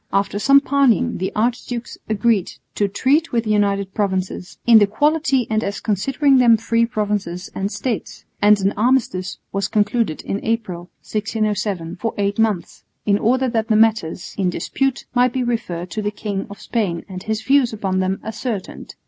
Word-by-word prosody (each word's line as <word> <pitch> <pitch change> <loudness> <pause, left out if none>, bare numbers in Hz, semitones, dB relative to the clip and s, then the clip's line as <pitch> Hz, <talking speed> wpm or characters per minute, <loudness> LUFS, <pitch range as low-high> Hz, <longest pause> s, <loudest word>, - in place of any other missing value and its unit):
After 200 +1 0
some 275 +5 +6
parleying 265 -4 +2
the 185 - -2
archdukes 235 +1 -2
agreed 215 -2 +1 0.2
to 205 - +1
treat 280 +10 +1
with 230 -2 +1
the 215 - -1
United 200 -2 +1
Provinces 190 -3 -2
"in 230 -2 +8
the 205 - +4
quality 275 +2 +1
and 220 0 0
as 200 - -3
considering 265 +7 +2
them 235 -3 +6
free 230 +1 +1
provinces 205 -5 -3
and 195 +1 -3
states," 240 -3 -4 0.2
and 205 0 +6
an 195 +1 +2
armistice 215 -5 0
was 195 -1 -1
concluded 210 -4 0
in 200 - -3
April, 190 -6 -3
1607, 205 -5 -2
for 225 +5 -3
eight 200 +1 -1
months, 215 -6 -1 0.2
in 200 -1 +3
order 255 +3 +2
that 225 -2 -1
the 220 - +2
matters 215 -7 +1
in 185 -2 +2
dispute 270 +8 -2
might 245 0 +3
be 260 -2 0
referred 180 -8 -3
to 215 - -3
the 205 - -1
King 205 -2 -4
of 200 - -10
Spain 195 -8 -2
and 185 -2 -7
his 220 +2 -3
views 270 -3 +3
upon 195 -4 -1
them 190 +1 0
ascertained. 220 -2 -5
215 Hz, 175 wpm, -20 LUFS, 195-240 Hz, 0.2 s, in